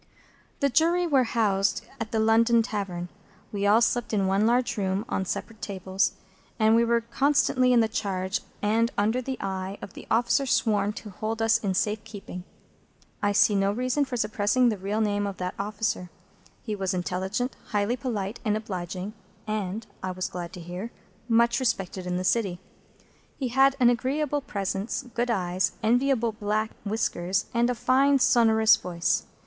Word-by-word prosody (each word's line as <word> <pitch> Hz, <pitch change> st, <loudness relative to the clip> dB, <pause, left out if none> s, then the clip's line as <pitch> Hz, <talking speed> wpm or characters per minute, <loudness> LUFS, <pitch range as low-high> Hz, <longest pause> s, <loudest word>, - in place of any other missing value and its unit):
The 280 Hz, -, +3 dB
Jury 335 Hz, +6 st, +3 dB
were 275 Hz, -6 st, +3 dB
housed 205 Hz, -3 st, +1 dB
at 225 Hz, -1 st, -4 dB
the 225 Hz, -, 0 dB
London 225 Hz, +1 st, +4 dB
Tavern. 190 Hz, -6 st, -4 dB, 0.4 s
We 205 Hz, -1 st, -1 dB
all 215 Hz, +3 st, +5 dB
slept 240 Hz, -1 st, +1 dB
in 200 Hz, -2 st, +2 dB
one 195 Hz, +3 st, +2 dB
large 245 Hz, +1 st, +2 dB
room 195 Hz, 0 st, -1 dB
on 190 Hz, -, -1 dB
separate 220 Hz, +4 st, -5 dB
tables, 190 Hz, -1 st, -1 dB, 0.4 s
and 220 Hz, 0 st, +4 dB
we 230 Hz, -, +5 dB
were 235 Hz, 0 st, +2 dB
constantly 255 Hz, +1 st, +2 dB
in 240 Hz, -2 st, +5 dB
the 225 Hz, -, +2 dB
charge 190 Hz, -3 st, -2 dB, 0.2 s
and 225 Hz, +3 st, +2 dB
under 220 Hz, +5 st, +1 dB
the 260 Hz, +1 st, -4 dB
eye 190 Hz, 0 st, -4 dB
of 200 Hz, -, -9 dB
the -, -, -11 dB
officer 240 Hz, +4 st, +2 dB
sworn 210 Hz, -4 st, +2 dB
to 210 Hz, 0 st, -9 dB
hold 220 Hz, +4 st, -4 dB
us 225 Hz, 0 st, +3 dB
in 195 Hz, -4 st, -1 dB
safe 210 Hz, +3 st, 0 dB
keeping. 195 Hz, -4 st, -9 dB, 0.8 s
I 205 Hz, -, +2 dB
see 205 Hz, +1 st, +4 dB
no 195 Hz, 0 st, +2 dB
reason 255 Hz, +6 st, 0 dB
for 260 Hz, -3 st, -4 dB
suppressing 215 Hz, +3 st, +2 dB
the 215 Hz, -, -2 dB
real 205 Hz, +3 st, -1 dB
name 205 Hz, -1 st, 0 dB
of 195 Hz, -, -5 dB
that 180 Hz, 0 st, -3 dB
officer. 205 Hz, -3 st, -2 dB, 0.5 s
He 215 Hz, -3 st, -3 dB
was 190 Hz, -1 st, -1 dB
intelligent, 190 Hz, +7 st, -2 dB
highly 210 Hz, +2 st, 0 dB
polite, 225 Hz, -4 st, -4 dB
and 215 Hz, -2 st, +1 dB
obliging, 190 Hz, -1 st, -5 dB, 0.3 s
and 215 Hz, 0 st, -3 dB, 0.2 s
(I 185 Hz, -, -3 dB
was 185 Hz, 0 st, -3 dB
glad 175 Hz, -1 st, -6 dB
to -, -, -8 dB
hear) 180 Hz, +6 st, -6 dB, 0.4 s
much 235 Hz, +1 st, +3 dB
respected 195 Hz, -7 st, -2 dB
in 180 Hz, 0 st, -1 dB
the 185 Hz, -, -2 dB
City. 190 Hz, -3 st, +1 dB, 0.8 s
He 260 Hz, -3 st, -2 dB
had 270 Hz, +2 st, +4 dB
an 245 Hz, -1 st, +6 dB
agreeable 285 Hz, +4 st, -1 dB
presence, 200 Hz, -2 st, -3 dB
good 240 Hz, +2 st, -1 dB
eyes, 185 Hz, -4 st, 0 dB
enviable 240 Hz, 0 st, +2 dB
black 215 Hz, +1 st, -1 dB
whiskers, 195 Hz, -3 st, -1 dB
and 235 Hz, +1 st, +2 dB
a 250 Hz, -, 0 dB
fine 265 Hz, +4 st, +3 dB
sonorous 225 Hz, -3 st, +5 dB
voice. 170 Hz, -1 st, -1 dB
215 Hz, 170 wpm, -26 LUFS, 195-235 Hz, 0.8 s, an